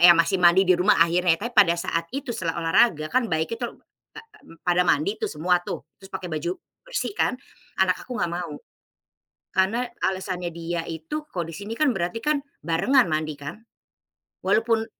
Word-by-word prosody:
ya 175 Hz, 0 st, +10 dB
masih 185 Hz, +3 st, +2 dB
mandi 175 Hz, +2 st, +6 dB
di 185 Hz, 0 st, +5 dB
rumah 185 Hz, +4 st, +4 dB
akhirnya. 170 Hz, 0 st, +3 dB
Tapi 235 Hz, +6 st, -5 dB
pada 170 Hz, -7 st, +6 dB
saat 170 Hz, -1 st, -2 dB
itu 275 Hz, -3 st, -4 dB
setelah 170 Hz, -6 st, -2 dB
olahraga 165 Hz, -3 st, +3 dB
kan 255 Hz, -1 st, +2 dB
baik 160 Hz, +7 st, -1 dB
itu, 245 Hz, -, -3 dB, 0.5 s
a -, -, -6 dB
a -, -, -18 dB, 0.4 s
pada 180 Hz, 0 st, +3 dB
mandi 170 Hz, +9 st, +2 dB
tuh -, -, -1 dB
semua 175 Hz, +4 st, +1 dB
tuh, 175 Hz, -, -6 dB
terus 195 Hz, -, -13 dB
pakai 185 Hz, -2 st, -5 dB
baju 155 Hz, +3 st, -2 dB, 0.3 s
bersih -, -, -2 dB
kan, -, -, +2 dB, 0.5 s
anak 185 Hz, -1 st, +2 dB
aku 250 Hz, -, -5 dB
nggak 175 Hz, -, -1 dB
mau. 170 Hz, -3 st, -4 dB, 1.0 s
Karena 200 Hz, +7 st, +2 dB, 0.2 s
alasannya 185 Hz, -2 st, -1 dB
dia 170 Hz, 0 st, -3 dB
itu 170 Hz, -, -5 dB
kalau 175 Hz, -, -3 dB
di 165 Hz, -, -8 dB
sini 205 Hz, +6 st, -6 dB
kan 305 Hz, -3 st, +3 dB
berarti 175 Hz, +2 st, -2 dB
kan 300 Hz, -1 st, +1 dB, 0.2 s
barengan 175 Hz, -, +3 dB
mandi 155 Hz, -1 st, -1 dB
kan. 145 Hz, +8 st, -7 dB, 0.9 s
Walaupun 225 Hz, 0 st, +2 dB
180 Hz, 180 wpm, -24 LUFS, 165-220 Hz, 1.0 s, ya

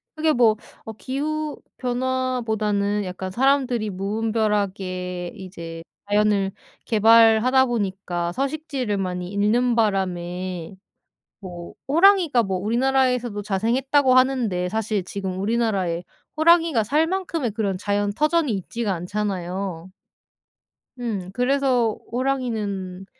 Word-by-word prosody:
그게 310 Hz, 0 st, +2 dB
뭐 230 Hz, -3 st, +4 dB, 0.3 s
어 220 Hz, -, -6 dB
기후 300 Hz, +5 st, -3 dB, 0.2 s
변화보다는 235 Hz, -5 st, -1 dB
약간 185 Hz, +1 st, -5 dB
사람들이 255 Hz, -2 st, +1 dB
무분별하게 195 Hz, -3 st, -2 dB
이제 170 Hz, -4 st, -8 dB, 0.3 s
자연을 205 Hz, -2 st, +2 dB, 0.3 s
개발하다 225 Hz, +3 st, +5 dB
보니까 190 Hz, -6 st, -2 dB
서식지를 270 Hz, -, -2 dB
많이 180 Hz, -2 st, -3 dB
잃는 230 Hz, +4 st, +2 dB
바람에 185 Hz, -4 st, -2 dB, 0.6 s
뭐 175 Hz, -3 st, -9 dB
"호랑이가 335 Hz, -, +5 dB
뭐 190 Hz, -2 st, -2 dB
우리나라에서도 245 Hz, +1 st, +1 dB
자생했다."고 255 Hz, +7 st, +2 dB
하는데 240 Hz, -9 st, +2 dB
사실 215 Hz, -1 st, -1 dB
지금 190 Hz, 0 st, -5 dB
우리나라에 200 Hz, -6 st, 0 dB, 0.3 s
호랑이가 325 Hz, -6 st, +4 dB
살 300 Hz, +8 st, +2 dB
만큼의 335 Hz, -, -2 dB
그런 200 Hz, -3 st, -1 dB
자연 205 Hz, +1 st, 0 dB
터전이 305 Hz, +2 st, +1 dB
있지가 210 Hz, +3 st, -3 dB
않잖아요. 185 Hz, -1 st, -4 dB, 1.1 s
음 205 Hz, -7 st, -3 dB
그래서 250 Hz, -3 st, +1 dB
호랑이는 215 Hz, -8 st, -2 dB
215 Hz, 270 characters per minute, -23 LUFS, 190-255 Hz, 1.1 s, 개발하다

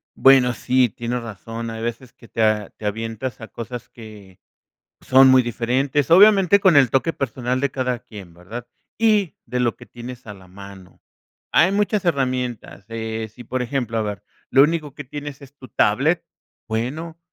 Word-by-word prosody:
Bueno, 130 Hz, -2 st, +5 dB
sí, 125 Hz, -1 st, +2 dB
tienes 120 Hz, +3 st, -4 dB
razón. 115 Hz, +2 st, -7 dB
Hay 115 Hz, 0 st, -6 dB
veces 120 Hz, +2 st, -5 dB
que 115 Hz, -, -18 dB
te 115 Hz, -, -3 dB
a 105 Hz, -2 st, +1 dB
te 110 Hz, -, -12 dB
avientas 115 Hz, +4 st, -4 dB
a 110 Hz, -, -7 dB
cosas 120 Hz, +1 st, -8 dB
que 105 Hz, -5 st, -13 dB, 0.6 s
son 130 Hz, +1 st, +6 dB
muy 130 Hz, 0 st, +6 dB
diferentes, 125 Hz, +5 st, -1 dB
obviamente 200 Hz, +1 st, +6 dB
con 190 Hz, -5 st, +5 dB
el 135 Hz, -5 st, +5 dB
toque 150 Hz, +5 st, +1 dB
personal 125 Hz, -1 st, -2 dB
de 140 Hz, 0 st, 0 dB
cada 125 Hz, -2 st, -2 dB
quien, 95 Hz, -6 st, -12 dB
¿verdad? 110 Hz, +8 st, -9 dB, 0.3 s
Y 210 Hz, -7 st, +2 dB
de 125 Hz, +2 st, -2 dB
lo 120 Hz, -2 st, 0 dB
que -, -, -14 dB
tienes 120 Hz, +1 st, -10 dB
a 105 Hz, -, -8 dB
la 95 Hz, -1 st, -16 dB
mano. 95 Hz, 0 st, -13 dB, 0.5 s
Hay 185 Hz, +4 st, +5 dB
muchas 205 Hz, 0 st, 0 dB
herramientas, 125 Hz, -, -2 dB
eh, 110 Hz, -1 st, -4 dB
si 120 Hz, -, -12 dB
por 125 Hz, +2 st, -2 dB
ejemplo, 120 Hz, -2 st, -2 dB
a -, -, +1 dB
ver, 105 Hz, -3 st, -5 dB, 0.3 s
lo 135 Hz, +2 st, +6 dB
único 150 Hz, -2 st, 0 dB
que 145 Hz, -, -8 dB
tienes 145 Hz, +1 st, -8 dB
es 140 Hz, +1 st, -15 dB
tu 130 Hz, -, -13 dB
tablet, -, -, +2 dB, 0.5 s
bueno, 150 Hz, +9 st, -4 dB
125 Hz, 175 wpm, -21 LUFS, 110-140 Hz, 0.6 s, son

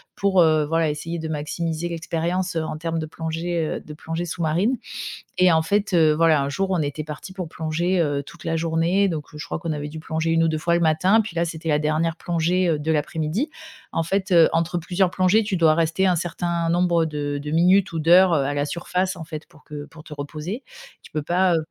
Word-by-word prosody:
pour, 195 Hz, -2 st, +2 dB
heu, 155 Hz, -2 st, +3 dB
voilà, 165 Hz, -1 st, +1 dB
essayer 165 Hz, +3 st, -5 dB
de 160 Hz, -1 st, -4 dB
maximiser 160 Hz, +2 st, -3 dB
l'expérience 170 Hz, +2 st, -2 dB
en 155 Hz, -1 st, -2 dB
termes 165 Hz, +1 st, -2 dB
de 155 Hz, -, -4 dB
plongée, 165 Hz, +1 st, -3 dB
heu, -, -, -3 dB
de 150 Hz, -, -10 dB
plongée 165 Hz, +3 st, -4 dB
sous-marine 175 Hz, +9 st, 0 dB, 0.6 s
et 180 Hz, 0 st, +5 dB
en 160 Hz, -1 st, +4 dB
fait, 200 Hz, +3 st, 0 dB
heu, 160 Hz, -3 st, +5 dB
voilà, 160 Hz, -2 st, +4 dB
un 140 Hz, -, -1 dB
jour, 190 Hz, +7 st, -1 dB
on 180 Hz, -3 st, +1 dB
était 145 Hz, +1 st, -3 dB
parti 150 Hz, +5 st, -8 dB
pour 180 Hz, -4 st, -5 dB
plonger, 165 Hz, +4 st, -1 dB
heu, 145 Hz, -3 st, 0 dB
toute 165 Hz, +4 st, -14 dB
la 165 Hz, -, 0 dB
journée, 165 Hz, +4 st, +1 dB
donc 155 Hz, -3 st, -3 dB
je 150 Hz, -, -6 dB
crois -, -, -3 dB
qu'on 170 Hz, -1 st, -3 dB
avait 150 Hz, 0 st, -4 dB
dû 160 Hz, +1 st, -8 dB
plonger 160 Hz, +1 st, -2 dB
1 165 Hz, 0 st, +3 dB
ou -, -, +3 dB
2 160 Hz, -1 st, 0 dB
fois 170 Hz, +1 st, +1 dB
le -, -, +2 dB
matin, 170 Hz, +6 st, +3 dB
puis 205 Hz, -5 st, -8 dB
là, 170 Hz, -, +2 dB
c'était 165 Hz, -1 st, -5 dB
la 150 Hz, -1 st, +3 dB
dernière 155 Hz, +2 st, 0 dB
plongée, 175 Hz, +2 st, 0 dB
heu, 155 Hz, -2 st, +1 dB
de 155 Hz, +2 st, -1 dB
l'après-midi. 160 Hz, -, -1 dB, 0.4 s
En 165 Hz, -, 0 dB
fait, 190 Hz, +3 st, -1 dB
heu, 170 Hz, -2 st, +7 dB
entre 170 Hz, +1 st, 0 dB
plusieurs 180 Hz, +2 st, +1 dB
plongées, 190 Hz, +4 st, +3 dB
tu 205 Hz, -2 st, -1 dB
dois 160 Hz, -2 st, +5 dB
rester 165 Hz, +3 st, +1 dB
un 180 Hz, -, +3 dB
certain 170 Hz, 0 st, -2 dB
nombre 175 Hz, -1 st, +2 dB
de 155 Hz, -2 st, -4 dB, 0.2 s
de 150 Hz, +1 st, -5 dB
minutes 180 Hz, +4 st, +4 dB
ou 165 Hz, -, -3 dB
d'heures, 175 Hz, +3 st, +6 dB
heu, 145 Hz, -4 st, +2 dB
à 145 Hz, -, -1 dB
la 145 Hz, 0 st, 0 dB
surface, 180 Hz, +3 st, -2 dB
en 170 Hz, -, -7 dB
fait, 155 Hz, -1 st, -8 dB
pour 150 Hz, -, -21 dB
que 145 Hz, -1 st, -8 dB
pour 160 Hz, 0 st, -14 dB
te 155 Hz, -, -10 dB
reposer. 155 Hz, -, -5 dB, 0.4 s
Tu -, -, -15 dB
peux 155 Hz, -, -2 dB
pas, 180 Hz, +2 st, +2 dB
heu -, -, +3 dB
165 Hz, 235 wpm, -23 LUFS, 155-175 Hz, 0.6 s, heu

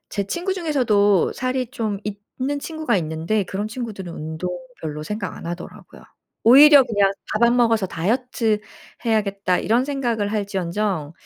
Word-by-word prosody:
제 200 Hz, -, -2 dB
친구 350 Hz, -, -2 dB
중에서도 220 Hz, -, +2 dB
살이 255 Hz, 0 st, -2 dB
좀 215 Hz, -6 st, -3 dB, 0.4 s
있는 285 Hz, +2 st, -1 dB
친구가 315 Hz, -7 st, -1 dB
있는데 165 Hz, +6 st, -1 dB
그런 200 Hz, +3 st, -4 dB
친구들은 215 Hz, -7 st, -6 dB
운동 160 Hz, +3 st, -5 dB, 0.3 s
별로 150 Hz, -1 st, -5 dB
생각 210 Hz, +1 st, -4 dB
안 -, -, -9 dB
하더라고요. 175 Hz, +1 st, -8 dB, 0.4 s
오히려 280 Hz, +4 st, +9 dB
그냥 205 Hz, -4 st, +2 dB, 0.2 s
'밥 215 Hz, -, 0 dB
안 240 Hz, +1 st, +4 dB
먹어서 225 Hz, -5 st, +3 dB
다이어트 220 Hz, +5 st, 0 dB, 0.5 s
해야겠다.' 200 Hz, -5 st, +1 dB
이런 235 Hz, +4 st, +2 dB
생각을 240 Hz, -7 st, -1 dB
할지언정 195 Hz, -5 st, -2 dB
215 Hz, 335 characters per minute, -22 LUFS, 190-250 Hz, 0.5 s, 오히려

